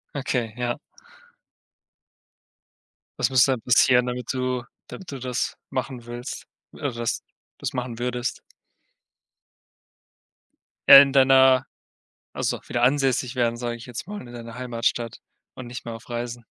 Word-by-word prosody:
Okay, 125 -5 -2
ja. 120 -1 -1 2.4
Was - - +2
müsste 130 0 +5
denn 125 - -5
passieren, 125 +1 +4
damit 125 +1 -3
du 125 -1 -1 0.2
damit 185 -4 -9
du 135 - -6
das 125 -1 -2
machen 125 -3 -4
willst 120 +2 -7 0.3
oder 145 - -3
das 115 -1 -2 0.4
das - - -3
machen 125 -2 -4
würdest? 125 0 -3 2.5
Äh, 140 - +13
in 140 -1 +2
deiner 130 -1 +6 0.7
also - - -1
wieder 120 - -2
ansässig 130 -1 +2
werden, 120 -2 +1
sage 120 0 -3
ich 115 - -11
jetzt 125 +3 -7
mal, 205 -8 -7
in 120 - -12
deiner 115 -1 -9
Heimatstadt 120 -2 -2 0.4
und 130 - -8
nicht 120 0 -8
mehr 115 - -6
auf 115 +2 -12
Reisen. 120 0 -5
125 Hz, 135 wpm, -24 LUFS, 120-130 Hz, 2.5 s, Äh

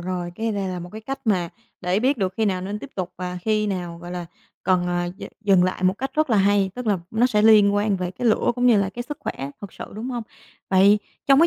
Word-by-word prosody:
rồi, 175 -1 -4
cái 225 +3 -2
này 195 -2 -2
là 180 - -3
một 175 0 -7
cái 220 - -7
cách 270 +5 -5
mà 180 -5 +2 0.3
để 180 +3 +1
biết 260 +1 +2
được 185 -1 -1
khi 225 - +1
nào 185 -3 0
nên 200 +3 -4
tiếp 275 +5 -9
tục 185 -1 -4
và 180 0 -4
khi 215 -1 +1
nào, 175 -4 -3
gọi 175 +1 -9
là, 180 -1 -5 0.4
cần, 180 -1 +2
ờ, 175 0 -1
d - - -12 0.2
dừng 195 -4 +4
lại. 185 0 -2
Một 185 0 +3
cách 270 +1 -2
rất 310 -4 +1
là 220 - +4
hay, 200 0 +3
tức 250 -2 -6
là 200 -3 +2
nó 225 +3 +3
sẽ 210 -4 +2
liên 210 -2 +6
quan 205 -1 +2
về 180 -1 -3
cái 240 +6 -3
lửa 220 - +2
cũng 245 0 +1
như 240 -3 +6
là 195 - -1
cái 240 - -5
sức 290 +4 -6
khỏe 135 +1 -4
thật 200 - -8
sự, - - -7
đúng 230 +5 -5
hông? 240 -2 -3 0.5
Vậy 200 +2 +6 0.3
trong 275 +1 +6
cái 335 - +7
200 Hz, 275 wpm, -23 LUFS, 180-220 Hz, 0.5 s, cái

